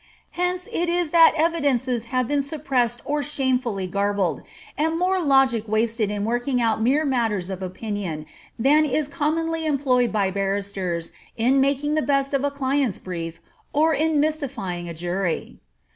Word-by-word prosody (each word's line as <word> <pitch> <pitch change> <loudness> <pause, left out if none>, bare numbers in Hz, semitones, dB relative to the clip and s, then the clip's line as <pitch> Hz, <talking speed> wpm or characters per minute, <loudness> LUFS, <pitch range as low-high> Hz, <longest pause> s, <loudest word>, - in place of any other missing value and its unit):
Hence 360 +1 -2
it 345 0 0
is 345 -2 0
that 330 -1 +7
evidences 275 -7 +1
have 255 0 -1
been 290 +1 +1
suppressed 265 -5 -1
or 295 +1 0
shamefully 255 -8 -1
garbled, 200 -4 0 0.3
and 320 +2 0
more 370 +1 +1
logic 270 -7 +3
wasted 220 0 0
in 205 0 -2
working 245 +3 0
out 225 -2 +1
mere 275 +7 +2
matters 225 -8 0
of 190 0 -5
opinion 185 -4 -4 0.3
than 285 +6 +4
is 300 0 0
commonly 325 +3 -1
employed 260 -4 +2
by 200 -3 +1
barristers 195 -3 -2 0.3
in 255 +4 +3
making 280 +2 +1
the 310 - +2
best 275 -1 0
of 275 0 +1
a 285 - +2
client's 275 -5 0
brief, 165 -3 -6 0.3
or 315 +2 +3
in 310 +1 +2
mystifying 250 - -2
a - - -5
jury. 175 +1 -3
255 Hz, 155 wpm, -23 LUFS, 205-295 Hz, 0.3 s, that